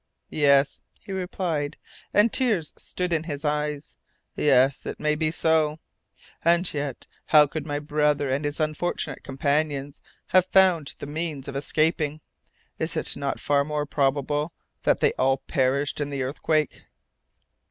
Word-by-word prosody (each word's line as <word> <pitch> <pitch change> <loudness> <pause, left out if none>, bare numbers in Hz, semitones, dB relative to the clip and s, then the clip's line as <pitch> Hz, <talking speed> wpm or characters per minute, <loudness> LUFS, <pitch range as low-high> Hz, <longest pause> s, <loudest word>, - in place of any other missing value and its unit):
"Yes," 140 -2 +3 0.2
he - - -10
replied, 180 -5 -2 0.3
and 210 +2 +4
tears 215 - +1
stood 180 -1 -3
in 160 -1 0
his 145 -2 -5
eyes, 150 0 -2 0.4
"yes, 135 -1 +3
it - - -5
may 150 0 +1
be 155 +1 0
so. 160 -1 +2 0.7
And 170 +2 +4
yet, 140 -4 -4 0.2
how 150 -2 +7
could 150 +1 -5
my 145 -1 -1
brother 150 -1 +1
and 135 +3 -1
his 145 +1 -2
unfortunate 155 +3 -2
companions 140 +1 -1 0.3
have 185 -1 +4
found 180 -6 +3
the - - -7
means 150 -2 -4
of 140 - -6
escaping? 155 +1 0 0.6
Is - - -2
it - - -1
not 140 -1 -3
far 140 -1 +2
more 150 0 -2
probable 145 +2 0 0.3
that - - +2
they - - +4
all 135 +1 +3
perished 135 +2 0
in 145 - -2
the 140 -2 -2
earthquake?" 150 +3 -1
150 Hz, 145 wpm, -25 LUFS, 140-160 Hz, 0.7 s, how